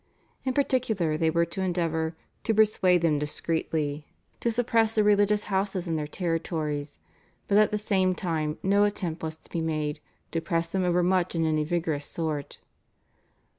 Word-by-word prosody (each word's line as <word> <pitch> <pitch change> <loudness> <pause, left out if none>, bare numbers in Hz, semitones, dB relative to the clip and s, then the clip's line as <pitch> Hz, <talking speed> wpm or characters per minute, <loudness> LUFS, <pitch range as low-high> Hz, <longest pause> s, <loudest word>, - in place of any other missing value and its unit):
In 260 - +1
particular 230 - +1
they 160 +1 +2
were 170 +1 +2
to 170 +3 -5
endeavour 165 -3 -1 0.3
"to 225 - +2
persuade 190 -5 +4
them 155 -3 +3
discreetly" 150 -1 -2 0.3
to 235 - 0
suppress 225 -1 +2
the 215 - +4
religious 205 0 +3
houses 190 -2 -1
in 165 - 0
their 150 -1 -2
territories, 155 -4 -2 0.5
but 205 0 +4
at 215 - +5
the 210 - -1
same 190 -3 +1
time 155 -4 -2
no 200 +2 +4
attempt 185 -5 -1
was 160 -1 -4
to - - -21
be 170 - -1
made 155 -2 -2 0.3
"to 165 - -1
press 165 0 -1
them 190 +1 0
overmuch 180 0 +2
in 165 -1 +1
any 155 -1 +1
vigorous 160 -3 -2
sort." 155 -4 -3
170 Hz, 165 wpm, -27 LUFS, 160-200 Hz, 0.5 s, at